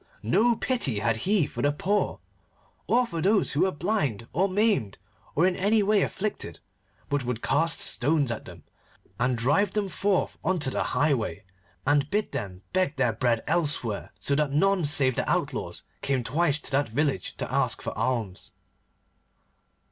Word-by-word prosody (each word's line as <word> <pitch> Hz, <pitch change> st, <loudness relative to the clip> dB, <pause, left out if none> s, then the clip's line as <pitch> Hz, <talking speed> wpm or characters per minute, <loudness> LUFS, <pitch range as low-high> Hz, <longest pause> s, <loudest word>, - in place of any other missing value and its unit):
No 235 Hz, +1 st, +3 dB
pity 225 Hz, -, -1 dB
had 115 Hz, +2 st, +1 dB
he 185 Hz, -, +1 dB
for -, -, -6 dB
the 145 Hz, -, +3 dB
poor, 200 Hz, +8 st, -1 dB, 0.7 s
or 250 Hz, +1 st, +3 dB
for 170 Hz, -8 st, -4 dB
those 200 Hz, +2 st, +2 dB
who 145 Hz, -, 0 dB
were 190 Hz, -, +3 dB
blind 145 Hz, -, -1 dB
or 190 Hz, +7 st, +2 dB
maimed 200 Hz, -, +1 dB, 0.4 s
or 165 Hz, -, +4 dB
in 185 Hz, -1 st, +2 dB
any 205 Hz, +3 st, +2 dB
way 205 Hz, 0 st, +3 dB
afflicted, 195 Hz, -, -3 dB, 0.5 s
but 145 Hz, -2 st, -1 dB
would 120 Hz, -2 st, -4 dB
cast 165 Hz, +2 st, +2 dB
stones 145 Hz, -1 st, +3 dB
at 115 Hz, -, -5 dB
them 85 Hz, -3 st, -12 dB, 0.6 s
and 125 Hz, 0 st, +1 dB
drive 145 Hz, -, +2 dB
them 205 Hz, -2 st, -1 dB
forth 195 Hz, +1 st, 0 dB
on 185 Hz, +2 st, +1 dB
to 145 Hz, -5 st, -1 dB
the -, -, 0 dB
highway, 125 Hz, -8 st, 0 dB, 0.4 s
and 145 Hz, +1 st, +2 dB
bid 210 Hz, +1 st, -1 dB
them 100 Hz, -9 st, -6 dB
beg 185 Hz, -5 st, +1 dB
their 125 Hz, -4 st, +1 dB
bread 115 Hz, 0 st, 0 dB
elsewhere, 150 Hz, -10 st, 0 dB
so 140 Hz, -, -1 dB
that 150 Hz, 0 st, +1 dB
none 185 Hz, +3 st, +2 dB
save 140 Hz, -3 st, +4 dB
the -, -, -2 dB
outlaws -, -, -2 dB, 0.2 s
came 135 Hz, -3 st, 0 dB
twice 150 Hz, +5 st, +1 dB
to -, -, -3 dB
that 140 Hz, -1 st, +1 dB
village 135 Hz, -, -1 dB
to -, -, -5 dB
ask -, -, +1 dB
for -, -, -5 dB
alms. 115 Hz, -7 st, -2 dB
145 Hz, 170 wpm, -26 LUFS, 125-190 Hz, 0.7 s, or